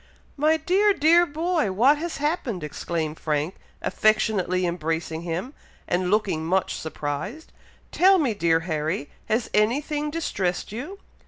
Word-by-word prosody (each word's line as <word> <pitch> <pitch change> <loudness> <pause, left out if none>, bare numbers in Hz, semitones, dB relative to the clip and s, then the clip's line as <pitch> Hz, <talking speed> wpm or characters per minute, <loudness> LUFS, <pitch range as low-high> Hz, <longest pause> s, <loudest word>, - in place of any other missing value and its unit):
"My 310 +2 +3
dear 390 +5 +3
dear 340 +2 +5
boy! 315 - 0
what 260 +10 +4
has 340 +1 -4
happened!" 280 - -2
exclaimed 155 +1 -3
Frank, 150 +3 -1 0.3
affectionately 205 -4 +2
embracing 165 -1 -2
him, 175 - -4 0.3
and 180 +1 0
looking 195 -6 +1
much 185 +3 0
surprised. 160 - -5 0.4
"Tell 385 +2 +5
me, 275 -10 +1
dear 165 -5 +2
Harry, 155 -2 -2 0.2
has 220 +2 0
any 215 +6 +3
thing 300 0 -3
distressed 195 - -2
you?" 280 - -6
210 Hz, 135 wpm, -24 LUFS, -, 0.4 s, dear